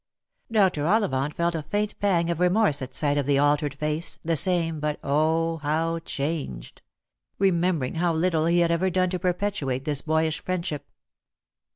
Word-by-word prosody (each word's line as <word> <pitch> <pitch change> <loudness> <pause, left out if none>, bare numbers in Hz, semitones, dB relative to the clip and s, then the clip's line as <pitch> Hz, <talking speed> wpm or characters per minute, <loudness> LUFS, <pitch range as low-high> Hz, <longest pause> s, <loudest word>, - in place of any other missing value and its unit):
3)r. 185 -8 +2
Ollivant 150 -10 +1
felt 170 0 0
a 165 - -2
faint 205 +7 -2
pang 170 -4 +1
of 170 - -3
remorse 180 -4 +2
at 130 0 -7
sight 145 +1 +1
of 140 - -2
the 140 -1 +3
altered 145 0 +2
face 150 +3 -2
— - - -42
the 165 0 +1
same, 165 -1 +1
but 150 0 -2
O, 160 +3 +1
how 160 +2 -1
changed! 140 - -5 0.3
— - - -63 0.2
remembering 175 -7 +1
how 170 +1 +1
little 160 -1 +1
he 175 +1 +3
had 170 -1 +2
ever 175 +3 +1
done 185 0 +1
to 185 - -2
perpetuate 180 -8 -1
this 145 -2 -1
boyish 160 0 0
friendship. 170 -6 -3
165 Hz, 175 wpm, -25 LUFS, 145-180 Hz, 0.3 s, the